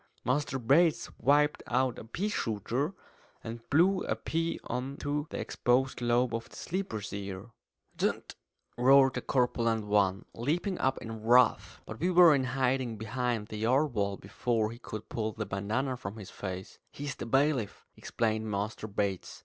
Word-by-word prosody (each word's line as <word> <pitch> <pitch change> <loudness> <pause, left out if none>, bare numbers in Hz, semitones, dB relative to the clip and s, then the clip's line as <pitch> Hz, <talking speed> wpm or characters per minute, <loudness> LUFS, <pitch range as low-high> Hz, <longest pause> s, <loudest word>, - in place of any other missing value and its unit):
Master 135 +1 0
Bates 150 +7 +3
whipped 145 +2 +3
out 125 0 +1
a - - -8
pea 180 - -3
shooter, 125 - -2 0.5
and 115 +1 -6
blew 185 +6 +4
a - - 0
pea 165 +1 -2
on 130 +3 -4
to 145 +1 -2
the - - -5
exposed 125 +1 0
lobe 120 0 +2
of 115 0 -4
the - - -15
sleeper's 115 - -4
ear. 100 +2 -6 0.5
"D - - +3
n!" - - -6 0.6
roared 135 +1 +6
the - - -3
corpulent 115 -4 +1
one, 100 -2 +2
leaping 170 - -1
up 130 0 +1
in 115 -1 -7
wrath. 120 +1 +3
But 110 - -8
we 175 +5 +1
were 175 -3 +8
in 135 -2 +1
hiding 130 -2 0
behind 115 0 -2
the 110 - -5
yard 130 +5 +2
wall 100 -2 -1
before 110 +2 -1
he 120 - -10
could 110 -3 -7
pull 110 -1 -3
the 110 0 -4
bandanna 110 +8 -1
from 100 -2 -7
his 100 -3 -9
face. 95 -1 -7
"He's 145 -1 -5
the - - -7
bailiff," 135 -3 +1
explained 110 -1 -1
Master 105 +2 -3
Bates. 100 -2 -3
120 Hz, 165 wpm, -30 LUFS, 110-140 Hz, 0.6 s, were